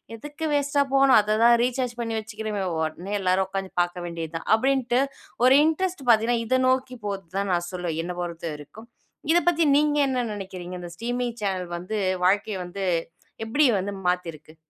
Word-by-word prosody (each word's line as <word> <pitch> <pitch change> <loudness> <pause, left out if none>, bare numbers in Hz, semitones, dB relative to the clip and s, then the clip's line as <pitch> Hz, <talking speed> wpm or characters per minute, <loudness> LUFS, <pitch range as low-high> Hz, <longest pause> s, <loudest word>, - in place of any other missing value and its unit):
"எதுக்கு 295 +7 -7
வேஸ்ட்டா 285 0 +2
போணும், 270 -1 +6
அத 210 0 +1
தான் 235 0 +7
ரீசார்ஜ் 250 0 -1
பண்ணி 230 -1 -2
வச்சிக்கிறமே, 215 -2 -4 0.2
உடனே 160 +5 -3
எல்லாரும் 190 0 +2
உட்காந்து 195 0 -4
பார்க்க 175 0 -3
வேண்டியது 165 -1 -5
தான்." - - -10
அப்படின்ட்டு 255 0 +1 0.4
ஒரு 255 - +7
இன்ட்ரெஸ்ட் 350 +1 -1
பார்த்தீங்கன்னா, 230 +1 +4
இத 255 +3 +2
நோக்கி 255 -1 0
போது 195 -2 -4
தான் 200 0 -1
நான் 175 0 -1
சொல்லுவேன், 175 -3 -3
என்ன 180 +1 -5
பொறுத்த 170 -2 -5
வரைக்கும். 150 +10 -12 0.5
இத - - +5
பத்தி 335 -2 +2
நீங்க 295 0 +2
என்ன 250 -2 0
நினைக்கிறீங்க? 185 -3 -7
இந்த 175 -1 -8
ஸ்ட்ரீமிங் 245 0 -3
சேனல் 185 -3 -2
வந்து 185 +5 -4 0.3
வாழ்க்கைய 200 +2 +2
வந்து 190 +2 -5 0.6
எப்படி 260 +7 +2 0.2
வந்து 200 +2 -3 0.2
மாத்திருக்கு? 165 -3 -4
210 Hz, 165 wpm, -25 LUFS, 180-255 Hz, 0.6 s, தான்